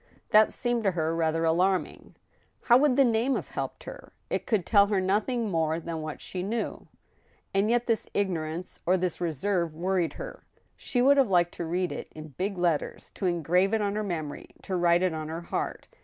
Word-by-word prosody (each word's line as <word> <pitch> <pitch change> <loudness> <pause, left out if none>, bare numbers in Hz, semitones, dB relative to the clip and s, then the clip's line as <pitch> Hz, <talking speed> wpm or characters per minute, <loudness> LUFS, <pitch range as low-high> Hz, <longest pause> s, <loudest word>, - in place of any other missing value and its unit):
That 215 0 +6
seemed 240 -2 -1
to 195 - +4
her 165 -1 -1
rather 165 0 +1
alarming. 180 +3 0 0.5
How 240 - +6
would 275 -1 +3
the 275 0 +5
name 235 +3 +2
have - - -4
helped - - -5
her? - - -10 0.2
It - - -2
could 215 -7 +1
tell 200 -2 +5
her 200 -2 +1
noth 195 +5 +1
ing 235 -4 -1
more 160 -1 0
than 165 -1 -5
what 155 -1 -6
she 180 - -5
knew. 220 +5 -3 0.7
And 195 +2 +2
yet 240 0 +2
this 225 -2 -1
ignorance, 175 -3 -2
or 185 +1 +4
this 180 -1 -2
reserve, 170 0 -1
worried 180 0 0
her. - - -8 0.3
She 245 -1 -1
would 280 +2 +6
have 265 -6 +4
liked 175 -2 +3
to 170 - -3
read 180 +2 -1
it - - -7
in 155 0 -8
big 190 +7 -3
letters, 170 -4 -1
to 190 - -2
engrave 180 +4 +2
it 220 - 0
on 200 0 -1
her 215 - -1
memory, 160 -7 -4 0.2
to 190 - -3
write 175 0 +3
it 185 -3 +1
on 155 -1 -4
her 165 +2 -5
heart. 170 - -4
185 Hz, 205 wpm, -27 LUFS, 165-215 Hz, 0.7 s, That